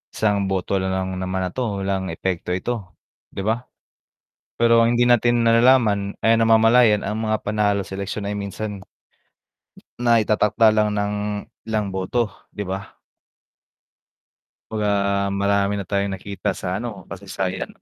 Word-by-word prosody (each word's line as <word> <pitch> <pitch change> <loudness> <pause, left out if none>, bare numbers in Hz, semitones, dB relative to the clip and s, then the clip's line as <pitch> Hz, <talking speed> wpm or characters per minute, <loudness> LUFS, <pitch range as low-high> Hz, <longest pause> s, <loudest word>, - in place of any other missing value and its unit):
isang 100 -2 +1
boto 95 0 -1
na 95 - -2
lang 95 0 -2
naman 95 0 -2
na 90 - -1
'to, 110 -3 -2
walang 95 -1 -1
epekto 90 +1 -3
ito, 95 -3 -4 0.4
'di - - -3
ba? 110 +4 0 1.0
Pero 115 0 +5
ang 115 - +3
hindi 120 0 +3
natin 120 0 +3
nalalaman, 115 -4 +4
ay, 115 +1 +4
namamalayan 115 -1 +5
ang 110 +2 -2
mga 110 0 +1
panalo 105 -1 +1
sa 95 - -7
eleksiyon 100 +1 -4
ay 105 - -3
minsan 100 0 -5 1.2
na 120 -1 +4
itatakda 105 +1 +3
lang 105 0 +2
ng 100 0 -1 0.6
ilang 105 -3 -1
boto, 95 +5 -1 0.3
'di 105 - -3
ba? 95 +1 -6 1.7
'Baga 105 -1 -1 0.5
marami 100 0 +1
na 100 - -6
tayong 100 -1 0
nakita 100 +1 -4
sa, 90 +1 -3
ano, 105 -5 -7
kasaysayan 95 -1 -4
100 Hz, 140 wpm, -22 LUFS, 95-110 Hz, 1.7 s, Pero